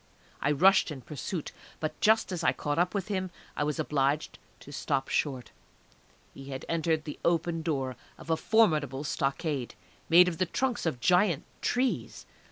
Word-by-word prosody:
I 145 - +2
rushed 190 +7 +5
in 145 -4 -7
pursuit, 155 +4 -5 0.3
but 155 -1 -4
just 220 -1 +4
as 180 - -3
I - - +4
caught 145 +1 -2
up 180 +3 +1
with 200 +1 -2
him 185 -2 -1 0.3
I - - 0
was 150 0 -1
obliged 145 +1 0 0.2
to 145 - -12
stop 135 -1 -1
short. 130 -5 -1 0.8
He 135 - -11
had 135 -1 -6
entered 160 -1 0
the 150 - -7
open 170 0 +1
door 135 -6 -2 0.2
of 165 - -6
a - - +4
formidable 155 - +2
stockade, 140 -2 -2 0.3
made 180 +2 +8
of 165 -3 -3
the 185 - +1
trunks 250 -2 -1
of 125 -7 -2
giant 180 -2 +3 0.2
trees. 250 +1 -1
155 Hz, 170 wpm, -29 LUFS, 140-180 Hz, 0.8 s, made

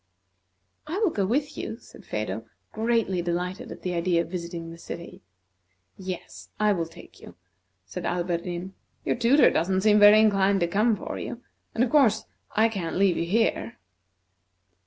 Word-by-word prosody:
"I 330 +5 -3
will 415 -5 +2
go 200 -7 0
with 290 +6 -1
you," 220 - -5
said 240 - -16
Phedo, 110 +1 -3 0.3
greatly 220 -5 0
delighted 175 +2 -3
at - - -10
the 180 - -2
idea 170 0 +1
of 170 - -12
visiting 170 -2 -5
the 165 - -11
city. 170 0 -8 0.7
"Yes, 185 -2 -7
I 210 -1 +4
will 170 -3 -2
take 165 +1 -15
you," - - -12 0.5
said 95 - -7
Alberdin. 175 +1 -3 0.3
"Your - - +1
tutor 245 +5 +5
don't 185 +4 +1
seem 210 +1 +4
inclined 205 -2 +6
to 170 - +2
come 215 +6 +2
for - - -6
you, 240 - -6 0.3
and, 230 - +3
of 250 - -1
course, 235 -8 +4 0.3
I 220 +2 +5
can't 190 -7 -4
leave 190 -2 +3
you 170 - -1
here." 190 - 0
190 Hz, 160 wpm, -26 LUFS, 170-220 Hz, 0.7 s, inclined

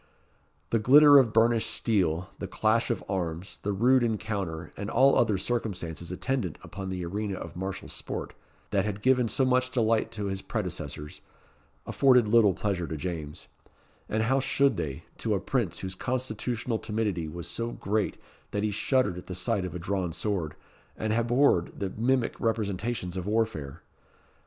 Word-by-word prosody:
The 115 - +3
glitter 145 +5 +8
of 120 -5 +3
burnished 115 0 +3
steel, 90 -6 0
the - - -4
clash 110 +2 +1
of 120 - -1
arms, 90 -1 -3
the 105 - -1
rude 125 +6 +4
encounter, 100 -8 -2
and 100 - -5
all 135 +3 +5
other 110 -4 +3
circumstances 90 -6 -3
attendant 100 - -2
upon 95 -2 -6
the 90 -2 -3
arena 100 +3 -3
of - - -8
martial 95 +2 -5
sport, - - -5 0.4
that 100 -2 +2
had 105 0 -4
given 125 -2 +4
so 130 +4 +1
much 130 0 +2
delight 115 -3 +1
to 105 -2 -3
his 95 -1 -3
predecessors, 75 0 -5 0.6
afforded 125 -5 +4
little 105 -4 +5
pleasure 95 -4 -1
to 80 - -4
James; 80 -2 -5 0.6
as 110 +1 +1
how 130 +4 +2
should 135 +1 +2
they, 70 -4 -4 0.2
to - - 0
a - - 0
prince - - -1
whose 95 0 -4
constitutional 120 0 -2
timidity 105 -7 -2
was 85 +2 -6
so 115 0 -3
great 105 -2 -1 0.3
that 105 - -2
he 105 - +1
shuddered 120 -3 +1
at - - -13
the 90 - -5
sight 90 +1 0
of 90 - -6
a - - -1
drawn 90 0 -2
sword, 90 -4 -2 0.4
and 110 0 -1
abhorred 120 -5 +2
the 95 -2 -2
mimic 120 +2 +1
representations 105 -3 -1
of 95 0 -4
warfare! 105 -11 -1
105 Hz, 165 wpm, -28 LUFS, 90-120 Hz, 0.6 s, glitter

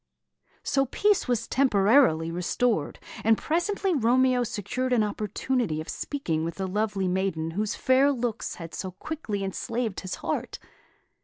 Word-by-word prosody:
So 275 -1 +1
peace 415 +9 +2
was 245 -3 0
temporarily 210 - +4
restored; 180 +2 0 0.3
and 225 0 +4
presently 375 +4 0
Romeo 255 -1 +3
secured 250 +4 -2
an 230 -3 +4
opportunity 210 -2 -1
of 155 - -6
speaking 165 - -2
with 165 +1 -3
the 190 - -3
lovely 205 0 -1
maiden 180 -3 -1
whose 210 +5 -2
fair 265 +2 +4
looks 240 -4 -3
had 165 -2 -9
so 190 - -4
quickly 210 - -4
enslaved 220 +2 -3
his 185 -1 -5
heart. - - -2
220 Hz, 140 wpm, -27 LUFS, 190-260 Hz, 0.3 s, temporarily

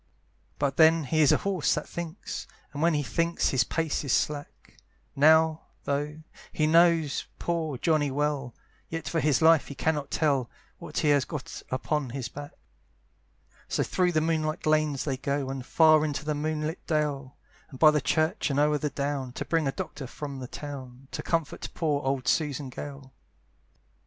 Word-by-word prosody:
But 140 -1 -1
then 160 0 +6
he 155 +3 +1
is 150 - +6
a - - +5
horse 190 -6 +1
that 150 - -4
thinks! 170 -2 -6 0.3
And 145 - -4
when 165 -1 +3
he 145 - 0
thinks 170 +4 0
his 130 -2 +3
pace 160 +4 -1
is 140 - -2
slack; 145 +3 -2 0.4
Now, 160 +2 +4 0.2
though 150 +2 -2 0.3
he 155 - +1
knows 165 -2 +3
poor 160 -5 -2
Johnny 155 0 +2
well, 140 -3 -2 0.3
Yet 165 -1 -5
for 165 - 0
his 150 0 +2
life 160 -2 +5
he 140 - -8
cannot 150 -1 -1
tell 140 -6 +1 0.3
What - - -8
he 150 - +2
has 145 -2 +4
got 150 -1 -7
upon 140 +1 -1
his 125 -1 -4
back. 145 0 -9 1.1
So - - 0
through 180 -1 +1
the 155 - +2
moonlight 155 -1 -1
lanes 155 -3 +2
they 135 -3 -2
go, 140 0 -2
And 135 -1 -5
far 155 +2 +5
into 150 -1 -3
the 150 - 0
moonlight 155 +2 -2
dale, 145 -4 -1 0.3
And 130 - -11
by 155 +2 +7
the 150 -1 +1
church, 160 +7 +1
and 140 0 0
o'er 150 0 +3
the 150 - -1
down, 140 -2 -3
To - - -5
bring 165 -3 +1
a - - +1
doctor 135 0 -6
from 140 +1 -7
the 125 - -6
town, 135 -2 -9
To - - -4
comfort 165 -3 -2
poor 150 -4 0
old 135 -2 -2
Susan 145 -2 0
Gale. 135 -1 -8
150 Hz, 175 wpm, -27 LUFS, 140-160 Hz, 1.1 s, by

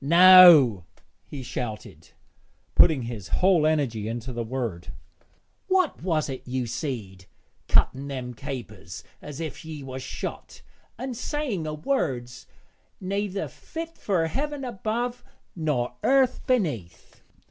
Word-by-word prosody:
'No,' 170 - +8 0.4
he 140 -3 -7
shouted, 120 -3 -6 0.6
putting 145 -6 +5
his 115 -6 -6
whole 180 - +3
energy 130 -9 0
into 120 +2 -5
the 120 0 -3
word. 115 -7 -4 0.8
'What 370 -4 +1
was't 155 -6 -1
ye 125 0 -2
seed, 115 -7 -5 0.4
cutting 135 +2 +2
them 130 -3 -5
capers 110 - -8 0.2
as 150 0 -8
if 160 -4 -6
ye 155 -3 -8
was 130 0 -7
shot, 130 - -7 0.3
an' 255 +2 -4
saying 245 - -3
o' 155 - -3
words 135 - -2 0.5
neyther 200 +1 -2
fit 330 0 -8
fur 180 -5 0
heaven 280 - -3
above 240 +2 -3 0.3
nor 150 -8 -1
earth 265 -1 +2
beneath?' 150 - -2
150 Hz, 115 wpm, -25 LUFS, 120-195 Hz, 0.8 s, No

